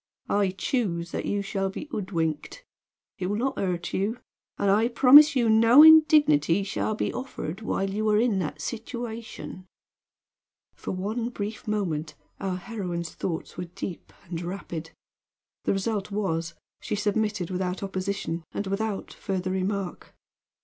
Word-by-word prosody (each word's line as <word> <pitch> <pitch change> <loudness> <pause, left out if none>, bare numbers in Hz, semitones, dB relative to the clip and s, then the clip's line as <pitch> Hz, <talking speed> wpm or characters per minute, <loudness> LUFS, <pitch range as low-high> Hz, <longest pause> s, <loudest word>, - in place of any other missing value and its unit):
I 200 -1 +3
choose 175 -8 -1
that - - -3
you 205 0 0
shall 195 -1 -1
be 195 - -7
hoodwinked. 175 - -3 0.5
It 180 - -1
will 205 - -1
not 265 +3 -1
hurt 180 -3 -2
you; 205 +5 0 0.4
and 200 - +2
I 215 +3 +4
promise 275 +5 +8
you 240 -3 +3
no 230 +6 +7
indignity 305 - +6
shall 205 +2 -2
be - - -2
offered 220 -8 -5
while 195 -2 -1
you 215 +2 -1
are 210 - +4
in 225 -4 +2
that 160 -5 -4
situation." 230 -5 -6 1.1
For - - -8
one 215 +6 -2
brief 215 -2 -6
moment 170 -8 -2 0.2
our 190 -2 -2
heroine's 180 -5 -5
thoughts 165 -3 -4
were 180 - -3
deep 175 +1 -7
and 170 -1 -5
rapid; 175 -3 -5 0.8
the - - +2
result 200 +1 -2
was 170 -5 -2 0.2
she - - -3
submitted 205 -3 -1
without 185 +1 -2
opposition 190 -3 -3
and 205 - -3
without 195 +1 -3
further 185 -1 -3
remark. 190 0 -3
200 Hz, 140 wpm, -26 LUFS, 180-225 Hz, 1.1 s, promise